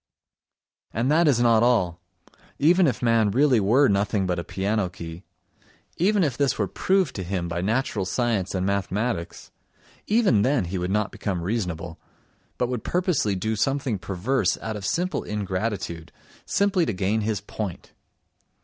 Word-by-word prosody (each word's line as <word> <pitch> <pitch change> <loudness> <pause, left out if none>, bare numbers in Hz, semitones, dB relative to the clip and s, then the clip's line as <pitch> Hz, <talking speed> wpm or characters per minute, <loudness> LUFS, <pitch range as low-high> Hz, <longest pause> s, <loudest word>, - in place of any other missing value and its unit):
And 120 +6 0
that 165 +2 +4
is 135 -5 +3
not 115 -2 +4
all: 95 -8 +2 0.6
even 175 +4 +4
if 125 -2 -2
man 115 -3 +3
really 130 +2 +3
were 120 +8 +4
nothing 100 0 +1
but 90 -1 -1
a - - -3
piano 100 +1 -1
key, 85 -1 -9 0.7
even 200 +2 +2
if 140 -6 0
this 140 -1 +1
were 105 - 0
proved 185 - +1
to 95 - -3
him 90 -1 -3
by 85 0 -3
natural 110 0 0
science 105 -2 -1
and 95 0 0
mathematics, 100 0 -2 0.6
even 210 - +3
then 125 -4 +2
he 90 +2 -3
would 90 +1 -2
not 105 +1 0
become 95 -5 -3
reasonable, 90 -5 -3 0.6
but 125 - 0
would 125 -3 -3
purposely 170 - 0
do 110 +4 -1
something 130 -2 0
perverse 100 +3 0
out 110 -1 -4
of 100 -2 -4
simple 180 +2 -1
ingratitude, 95 -4 -3 0.4
simply 200 -3 +2
to - - 0
gain 100 +4 0
his 105 -1 -1
point. 100 -4 -6
110 Hz, 160 wpm, -24 LUFS, 95-130 Hz, 0.7 s, that